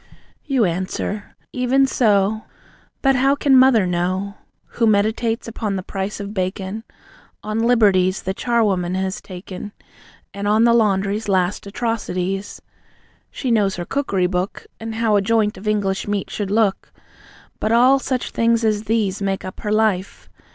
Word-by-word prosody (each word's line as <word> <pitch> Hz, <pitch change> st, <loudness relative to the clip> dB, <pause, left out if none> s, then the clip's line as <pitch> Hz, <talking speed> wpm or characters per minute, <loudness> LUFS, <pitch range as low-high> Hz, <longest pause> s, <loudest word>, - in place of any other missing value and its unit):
You 265 Hz, -6 st, +2 dB
answer: 190 Hz, +3 st, -3 dB, 0.2 s
"Even 255 Hz, +2 st, +2 dB
so. 215 Hz, -4 st, +1 dB, 0.6 s
But 270 Hz, -1 st, +4 dB
how 270 Hz, +2 st, +3 dB
can 280 Hz, -1 st, +3 dB
Mother 255 Hz, -6 st, +6 dB
know, 185 Hz, +3 st, -1 dB, 0.5 s
Who 230 Hz, -, +4 dB
meditates 220 Hz, +3 st, +1 dB
upon 215 Hz, -3 st, -3 dB
the 190 Hz, -, -4 dB
price 195 Hz, +2 st, -4 dB
of 200 Hz, 0 st, -6 dB
bacon? 190 Hz, +2 st, -3 dB, 0.6 s
On 215 Hz, +1 st, -2 dB
'liberties' 200 Hz, -6 st, +3 dB
the 190 Hz, -, -2 dB
charwoman 195 Hz, -6 st, 0 dB
has 190 Hz, +1 st, -2 dB
taken, 185 Hz, +2 st, -9 dB, 0.6 s
And 200 Hz, +1 st, -4 dB
on 215 Hz, +2 st, +4 dB
the 235 Hz, 0 st, +5 dB
laundry's 205 Hz, -1 st, +1 dB
last 190 Hz, +1 st, 0 dB
atrocities? 200 Hz, -3 st, -3 dB, 0.7 s
She 255 Hz, -, -3 dB
knows 205 Hz, -4 st, +2 dB
her 175 Hz, -, -5 dB
cookery 200 Hz, -9 st, 0 dB
book, 180 Hz, +1 st, -2 dB
And 225 Hz, 0 st, -6 dB
how 220 Hz, -2 st, +2 dB
a -, -, +2 dB
joint 215 Hz, 0 st, +1 dB
of 210 Hz, -, -9 dB
English 200 Hz, -2 st, 0 dB
meat 205 Hz, -1 st, -2 dB
should 205 Hz, -2 st, -3 dB
look. 210 Hz, -1 st, 0 dB, 0.7 s
But 215 Hz, -, -1 dB
all 255 Hz, +4 st, +5 dB
such 260 Hz, -2 st, -3 dB
things 230 Hz, 0 st, +2 dB
as 215 Hz, 0 st, 0 dB
these 210 Hz, -3 st, 0 dB
Make 195 Hz, -1 st, -2 dB
up 185 Hz, -, -8 dB
her 210 Hz, -, -3 dB
life. 210 Hz, -3 st, 0 dB
210 Hz, 150 wpm, -20 LUFS, 190-230 Hz, 0.7 s, Mother